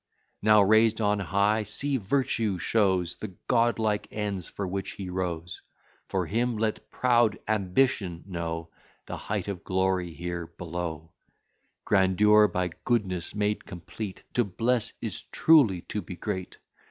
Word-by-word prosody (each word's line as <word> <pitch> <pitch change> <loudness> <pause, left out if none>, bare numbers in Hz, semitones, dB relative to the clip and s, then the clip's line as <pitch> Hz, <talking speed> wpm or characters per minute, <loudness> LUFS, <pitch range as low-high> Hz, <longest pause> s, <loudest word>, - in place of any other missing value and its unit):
Now 105 0 +6
raised 110 +2 +4
on 105 -1 +2
high, 100 +3 +2
see 135 +7 -1
Virtue 110 -3 0
shows 95 -3 +1
The 95 -4 -7
godlike 115 -3 +2
ends 100 -5 -3
for 100 - -4
which 95 +2 -4
he 95 -2 -6
rose; 85 -3 -4 0.5
For 95 -2 -1
him, 115 +5 0
let 110 0 -2
proud 120 -4 +3
Ambition 100 -3 +1
know 85 -3 -4 0.4
The - - -5
height - - -3
of 95 -4 -5
glory 95 -2 0
here 85 0 -5
below, 85 -2 -5 0.7
Grandeur, 105 +2 +5
by 90 -1 -2
goodness 95 -7 -1
made 105 0 0
complete! 95 +3 -7
To 120 - +3
bless, 115 +3 0
is - - -4
truly 130 - +5
to 105 - -4
be 90 - -8
great! 95 -1 -5
100 Hz, 135 wpm, -27 LUFS, 90-110 Hz, 0.7 s, Now